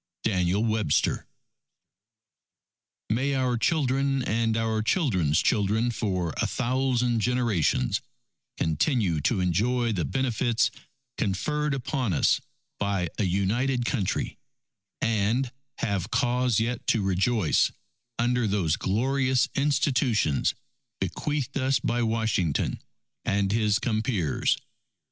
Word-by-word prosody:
DANIEL 95 0 +1
WEBSTER 110 -9 +1 1.8
May 135 +5 +1
our 130 -2 +1
children 135 -1 +1
and 115 -1 0
our 110 -1 0
children's 95 - +2
children 110 +2 +2
for 95 -7 -2
a - - +1
thousand 125 -1 0
generations 120 - +1 0.6
continue 85 - +1
to 95 - +1
enjoy 115 +7 +1
the 90 -6 -1
benefits 120 -1 +1 0.5
conferred 150 +9 0
upon 130 - -2
us 75 - +3 0.4
by 100 -4 0
a 105 - +2
United 120 +8 0
Country, 110 -8 -1 0.6
and 115 +4 +1 0.3
have 100 -2 -2
cause 125 -2 +1
yet 120 +1 -2
to 110 - +2
rejoice 95 0 +2 0.5
under 120 0 +1
those 95 -6 +1
glorious 130 +5 +1
institutions 130 - +1 0.4
bequeathed 145 -2 -2
us 130 +1 +2
by 120 0 0
Washington 110 -8 0 0.4
and 100 -1 +1
his 105 -1 +2
compeers! 110 - 0
115 Hz, 100 wpm, -26 LUFS, 100-125 Hz, 1.8 s, us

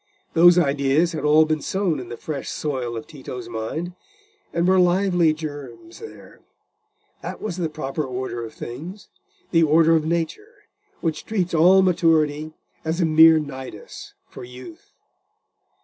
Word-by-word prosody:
Those 175 +1 +6
ideas 145 +1 +2
had 160 - -5
all 155 +1 +5
been 155 -1 -1
sown 190 -5 -1
in 125 - -9
the 120 - -7
fresh 145 -3 -6
soil 130 -6 -3
of 110 - -7
Tito's 125 -4 -9
mind, 120 +10 -5 0.6
and 170 +1 0
were 190 0 +4
lively 180 -2 +3
germs 155 - -8
there: 445 - -12 0.8
that - - -7
was 200 -5 -5
the 170 -3 -2
proper 155 -1 -4
order 130 -2 -5
of 115 - -7
things—the 205 - -5
order 165 +1 +4
of 160 - +1
nature, 170 - -4 0.4
which 160 -3 -3
treats 185 -6 -2
all 180 +4 +5
maturity 155 -4 +1 0.3
as 160 +2 -2
a 170 - +3
mere 160 0 +7
nidus 130 -7 -8
for - - -11
youth. 125 +6 -12
160 Hz, 145 wpm, -22 LUFS, 140-175 Hz, 0.8 s, mere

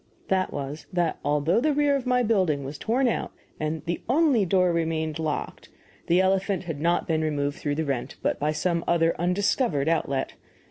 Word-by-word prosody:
That 190 -1 +1
was, 140 +2 -6
that 175 -3 0
although 150 +8 +2
the 305 +2 +2
rear 290 -1 +3
of 265 -2 -3
my 250 0 +3
building 185 -11 +1
was 140 +2 -7
torn 250 +4 +1
out 235 - -1 0.3
and 155 0 -3
the 170 0 -2
only 265 - +3
door 180 -1 +3
remained 160 -2 -1
locked, 155 -2 -4 0.4
the 175 +2 +4
elephant 190 0 +1
had 165 -5 -5
not 170 +2 +1
been 160 -1 +1
removed 145 -2 -1
through 145 -1 -1
the 160 +1 -1
rent, 135 -4 -3
but - - 0
by 150 +1 +1
some 170 +2 -1
other 165 -1 +2
(undiscovered) 180 - +1
outlet. 140 -5 0
170 Hz, 185 wpm, -26 LUFS, 150-195 Hz, 0.4 s, the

